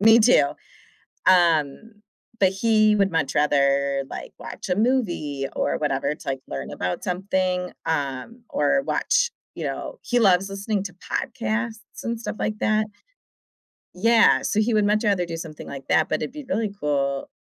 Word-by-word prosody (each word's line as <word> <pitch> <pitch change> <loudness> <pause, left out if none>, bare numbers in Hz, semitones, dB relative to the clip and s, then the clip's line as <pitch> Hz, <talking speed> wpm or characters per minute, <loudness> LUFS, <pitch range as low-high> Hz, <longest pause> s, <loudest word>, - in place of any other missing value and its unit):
Me, 225 +2 +7
too. 235 - +6 0.8
Um, 170 +2 +3 0.5
but 190 - +6
he 215 +1 +3
would 195 -3 +2
much 150 -4 0
rather, 140 -1 +2
like, - - -7
watch - - -8
a 180 - +2
movie, 175 - 0
or - - 0
whatever, 140 -1 0
to, - - -11
like, 135 -1 -2
learn 70 -1 -5
about 90 0 -3
something, 185 0 -1
um, 150 - -3
or 150 - +2
watch, - - +1 0.2
you - - -6
know - - -5
he 245 - +1
loves 195 -3 +4
listening 200 +1 -2
to 185 -4 -7
podcasts 230 +1 -4
and 235 0 -2
stuff 230 - -5
like 215 0 -2
that. 215 0 +1 1.1
Yeah, 230 +5 +4
so 210 - 0
he 230 +2 +1
would 210 -1 +3
much 210 +2 +2
rather 200 -5 +2
do 170 -1 -5
something 160 -2 -8
like 135 -1 -8
that, 155 - +3
but 155 - -1
it'd 150 - -3
be 300 - -8
really 225 -6 -1
cool. 140 -2 -1
190 Hz, 165 wpm, -24 LUFS, 150-220 Hz, 1.1 s, Me